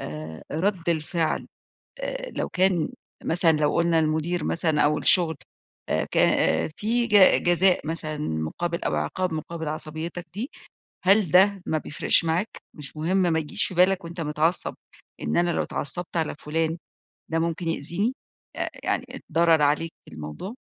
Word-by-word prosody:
آآ 80 +1 -7
رد 175 +1 -1
الفعل 160 0 0 0.5
آآ - - -4
لو - - -2
كان 185 -3 +2 0.3
مثلًا 165 0 +4
لو 150 -1 +1
قلنا 170 -1 +3
المدير 160 +2 0
مثلًا 160 -2 +1
أو 150 +1 +3
الشغل، 160 +2 +3 0.5
آآ - - +1
ك - - -2 0.6
في 235 +3 0
ج 205 -4 +6
جزاء 175 -2 +3
مثلًا 155 -2 0
مقابل 150 - -3
أو - - 0
عقاب 185 -2 -2
مقابل 160 0 -5
عصبيتك 160 +3 -5
دي، 225 +8 -4 0.5
هل 195 -3 +4
ده 195 +1 +5
ما 155 - 0
بيفرقش 150 +2 +2
معاك، 170 +7 0 0.2
مش 150 +1 -8
مهم، 170 +5 0
ما 175 -4 +2
يجيش 150 -2 +1
في - - -5
بالك 185 +1 +3
وأنت 170 0 -6
متعصب 155 +3 0 0.5
إن - - -1
أنا 175 0 +3
لو - - 0
اتعصبت 170 +5 -3
على 160 -3 -1
فلان 160 +2 -1 0.5
ده 165 - +1
ممكن 165 +1 -2
يأذيني، 175 - -1 0.4
آآ - - -2
يعني - - -1 0.3
ضرر 165 -1 +4
عليك 150 +3 +1 0.2
الموضوع؟ 75 - -7
165 Hz, 150 wpm, -25 LUFS, 155-180 Hz, 0.6 s, ج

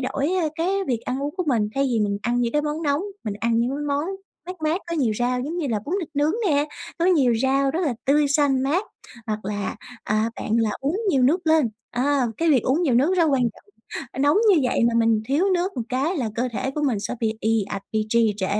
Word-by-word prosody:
đổi, 275 +2 -1
ơ, 315 - +1
cái 335 +3 -1 0.2
việc 240 -4 -1
ăn 260 +2 -3
uống 290 +1 -3
của 365 - -1
mình 230 -7 +1
thay 275 - +1
vì 240 -5 +1
mình 200 -1 0
ăn 240 +2 0
những 235 -1 0
cái 295 - +1
món 300 +2 -3
nóng. 290 +1 +1 0.2
Mình 210 -3 -3
ăn 230 0 +1
những 235 +2 +1
cái 275 - -3
món 285 +1 0 0.4
mát 365 +1 -6
mát 320 +5 +1
có 335 - -3
nhiều 250 -8 +1
rau 250 +1 0
giống 300 +7 -4
như 340 -4 -1
là 220 -3 0
bún 330 - -2
thịt 330 - -5
nướng 295 +2 +2 0.2
nè, 290 -2 +2 0.3
có 335 - +1
nhiều 290 -10 +4
rau 270 +1 +2
rất 325 +6 -2
là 265 - 0
tươi 290 +1 +3
xanh 280 -2 +2
mát, 315 +9 +1 0.4
hoặc 215 -2 -3
là, 205 0 -3 0.3
à, 215 +2 0
bạn - - -5
là 225 -2 +2
uống 285 +7 -1
nhiều 275 -8 +3
nước 330 +7 +2
lên. 315 -5 +4 0.2
À, 265 +1 +1
cái 335 - +1
việc 265 -5 +4
uống 280 +7 +1
nhiều 280 -8 +2
nước 285 +10 +3
rất 340 - +4
quan 270 -2 +2
trọng, 235 - -3 0.6
nóng 290 +4 +4 0.2
như 320 - +3
vậy - - +1
mà 235 0 +2
mình 225 -2 +3
thiếu 290 +7 +2
nước 360 -1 -1
một 245 - -1
cái 275 +8 0
là 240 -7 -1
cơ 245 +3 -1
thể 260 +4 -2
của 300 +2 -4
mình 250 -8 +1
sẽ - - -3
bị 225 -2 +1
ì 225 0 +2
ạch 200 -1 -4
bị 215 -1 0
trì 230 -2 +3
trệ. 190 -2 -1
270 Hz, 260 wpm, -23 LUFS, 235-300 Hz, 0.6 s, nhiều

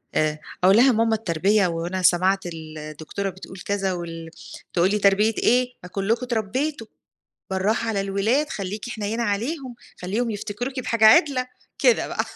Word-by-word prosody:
آآ 155 0 +1 0.2
أقول 190 +3 +6
لها: 255 +2 +6
"ماما 225 0 +2
التربية 195 0 +1
وأنا 170 +2 -3
سمعت 185 +2 +3
ال 155 -2 -8
دكتورة 195 +5 -4
بتقول 190 0 -11
كذا 195 -2 -1
وال" 165 -2 -6 0.4
تقول 175 +2 +3
لي: 210 - +1
"تربية 205 +3 +3
إيه؟ 250 +1 +2
ما 180 - -9
كلكم 215 +6 -1
أتربيتم. 240 +3 -2 0.7
بالراحة 215 +4 0
على 200 -3 0
الولاد، 215 +10 0
خلّيكِ 205 +4 -5
حنينة 220 +1 -3
عليهم، 245 +5 -2 0.3
خلّيهم 220 +6 -1
يفتكروكِ 235 +6 -4
بحاجة 230 -3 +2
عِدلة." 255 0 +5 0.3
كده - - +3
بقى - - -2
205 Hz, 150 wpm, -23 LUFS, 185-235 Hz, 0.7 s, أقول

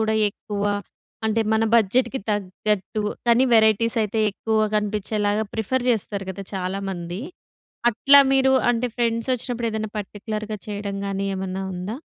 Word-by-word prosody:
గూడా 220 0 +1
ఎక్కువా 205 0 -3 0.5
అంటే, 220 +1 +1
మన 220 0 +3
బడ్జెట్‌కి 240 +4 +2
తగ్గట్టు, 205 +1 -1 0.2
కానీ 240 +2 +5
వెరైటీసయితే 220 0 +3
ఎక్కువ 220 +2 -1 0.2
కనిపిచ్చేలాగా 210 0 0
ప్రిఫర్ 245 +3 -1
చేస్తారు 205 -3 -2
గదా 195 +1 -7
చాలామంది. 185 -1 -4 0.7
అట్లా 280 +5 +6
మీరు 265 0 +4 0.2
అంటే, 245 +1 0
ఫ్రెండ్సొచ్చినప్పుడు 235 0 -1
ఏదన్నా 220 -1 -3
పర్టిక్యులర్‌గా 215 +1 -5
చెయ్యడం 205 -1 -4
గానీ, 195 0 -2
ఏమన్నా 190 0 -3
ఉందా? 190 +6 -4
215 Hz, 120 wpm, -23 LUFS, 200-230 Hz, 0.7 s, అట్లా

